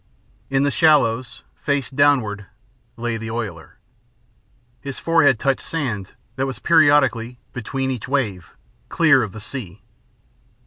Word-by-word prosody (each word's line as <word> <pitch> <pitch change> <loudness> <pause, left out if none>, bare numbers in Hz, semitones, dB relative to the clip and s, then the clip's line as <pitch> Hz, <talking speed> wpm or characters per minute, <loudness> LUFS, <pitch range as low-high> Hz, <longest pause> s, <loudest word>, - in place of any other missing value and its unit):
In 135 0 +2
the 140 - +1
shallows, 130 -7 +2
face 140 -3 -2
downward, 125 -8 +2 0.5
lay 120 -1 -2
the 110 0 -6
oiler. 110 -8 -6 1.0
His 140 -2 -7
forehead 160 -6 +3
touched 135 +3 0
sand 120 - -4 0.2
that 135 +1 0
was 130 -4 -5
periodically, 135 -5 +3 0.2
between 130 +2 -3
each 125 -5 -5
wave, 110 -10 -2 0.3
clear 155 -6 +4
of 110 -4 -3
the 110 - -9
sea. 105 -4 -8
130 Hz, 125 wpm, -21 LUFS, 110-140 Hz, 1.0 s, clear